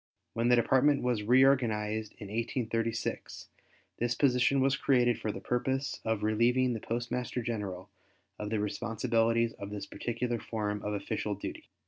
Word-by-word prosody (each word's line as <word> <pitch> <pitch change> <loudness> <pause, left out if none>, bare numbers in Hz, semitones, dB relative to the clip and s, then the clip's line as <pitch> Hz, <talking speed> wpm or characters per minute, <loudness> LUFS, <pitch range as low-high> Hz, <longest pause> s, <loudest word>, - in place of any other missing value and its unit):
When 115 +1 0
the 125 - +7
Department 130 +4 +3
was 125 -4 +1
reorganized 110 -3 +3
in 105 -3 -10
1836 115 0 -3 0.5
this 120 0 0
position 130 +1 +3
was 135 +1 +3
created 125 -4 +2
for 110 - -1
the - - -7
purpose 130 +3 -1
of 110 -2 -1
relieving 120 +4 +3
the 115 - -3
Postmaster 120 +2 -3
General 100 -5 -4 0.5
of 105 - -4
the 110 -1 0
responsibilities 115 +2 +1
of 100 - -8
this 105 -1 -5
particular 120 +2 -3
form 105 -2 -3
of 105 - -3
official 105 +1 -2
duty. 100 - -7
115 Hz, 145 wpm, -30 LUFS, 105-125 Hz, 0.5 s, the